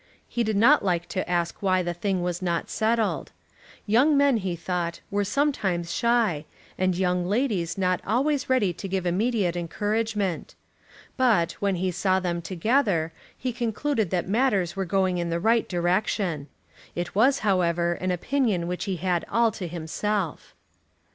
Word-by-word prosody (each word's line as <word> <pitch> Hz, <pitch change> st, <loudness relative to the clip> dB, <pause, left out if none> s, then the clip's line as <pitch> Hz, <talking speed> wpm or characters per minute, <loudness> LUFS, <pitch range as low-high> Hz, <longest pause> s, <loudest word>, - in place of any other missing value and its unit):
He 240 Hz, -, -1 dB
did 215 Hz, -1 st, -1 dB
not 265 Hz, +8 st, +5 dB
like 175 Hz, -3 st, 0 dB
to 185 Hz, -, -3 dB
ask 170 Hz, -1 st, -1 dB
why 185 Hz, -2 st, +2 dB
the 175 Hz, 0 st, -2 dB
thing 185 Hz, +1 st, -1 dB
was 180 Hz, 0 st, -2 dB
not 170 Hz, -2 st, -2 dB
settled. 225 Hz, 0 st, 0 dB, 0.5 s
Young 260 Hz, +8 st, +4 dB
men, 280 Hz, -3 st, +4 dB
he 185 Hz, -4 st, -2 dB
thought, 170 Hz, 0 st, -3 dB
were 205 Hz, 0 st, +1 dB
sometimes 195 Hz, -, 0 dB
shy, 230 Hz, -10 st, +1 dB, 0.3 s
and 185 Hz, -1 st, 0 dB
young 180 Hz, -1 st, +1 dB
ladies 200 Hz, -7 st, 0 dB
not 185 Hz, -1 st, +1 dB
always 275 Hz, +6 st, 0 dB
ready 225 Hz, -9 st, +2 dB
to 185 Hz, +4 st, -7 dB
give 190 Hz, -1 st, -2 dB
immediate 190 Hz, 0 st, +1 dB
encouragement. 205 Hz, +1 st, -2 dB, 0.6 s
But, 215 Hz, -10 st, +3 dB
when 200 Hz, -2 st, +1 dB
he 185 Hz, +1 st, -1 dB
saw 185 Hz, +2 st, +1 dB
them 175 Hz, -2 st, -2 dB
together, 185 Hz, -, +1 dB, 0.2 s
he 255 Hz, -1 st, -3 dB
concluded 235 Hz, -, -1 dB
that 180 Hz, -1 st, -1 dB
matters 200 Hz, -5 st, +1 dB
were 195 Hz, -1 st, -2 dB
going 185 Hz, -1 st, +1 dB
in 170 Hz, 0 st, -2 dB
the 170 Hz, 0 st, -1 dB
right 225 Hz, +5 st, +2 dB
direction. 175 Hz, -3 st, 0 dB, 0.5 s
It 175 Hz, 0 st, -3 dB
was, 260 Hz, +7 st, +4 dB
however, 175 Hz, -3 st, +2 dB
an 185 Hz, +2 st, -3 dB
opinion 195 Hz, 0 st, 0 dB
which 180 Hz, +3 st, -3 dB
he 195 Hz, -2 st, -1 dB
had 180 Hz, 0 st, 0 dB
all 230 Hz, -1 st, +3 dB
to 185 Hz, -3 st, -6 dB
himself. 175 Hz, +2 st, -3 dB
190 Hz, 160 wpm, -25 LUFS, 175-225 Hz, 0.6 s, not